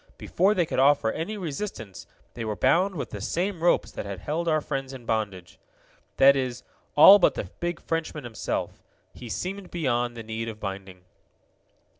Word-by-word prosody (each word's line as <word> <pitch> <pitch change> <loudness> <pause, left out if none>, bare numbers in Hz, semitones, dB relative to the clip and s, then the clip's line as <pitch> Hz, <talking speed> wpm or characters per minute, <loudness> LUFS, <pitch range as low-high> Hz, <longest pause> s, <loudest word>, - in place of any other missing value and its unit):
Before 195 +4 +1
they 175 -3 +2
could 155 - -2
offer 135 -5 +4
any 210 +7 -4
resistance 150 - -6 0.3
they 120 - -6
were 110 -1 -3
bound 180 - +2
with 150 - -5
the 105 - -6
same 175 - -2
ropes 175 - +2
that - - -6
had 100 -1 -6
held 160 - -2
our 155 -1 +3
friends 135 -2 -4
in 125 -3 -10
bondage. 100 -6 -3 0.6
That 140 +1 +7
is, 125 -2 -3 0.3
all 195 +7 +10
but - - +3
the - - -5
big 175 0 -3
Frenchman 165 -2 -3
himself. 115 -3 -4 0.3
He 120 - -10
seemed 190 - -5
beyond 120 -7 -1
the 115 - -6
need 110 +1 -4
of 110 -1 -9
binding. 95 -2 -7
135 Hz, 175 wpm, -26 LUFS, 110-170 Hz, 0.6 s, all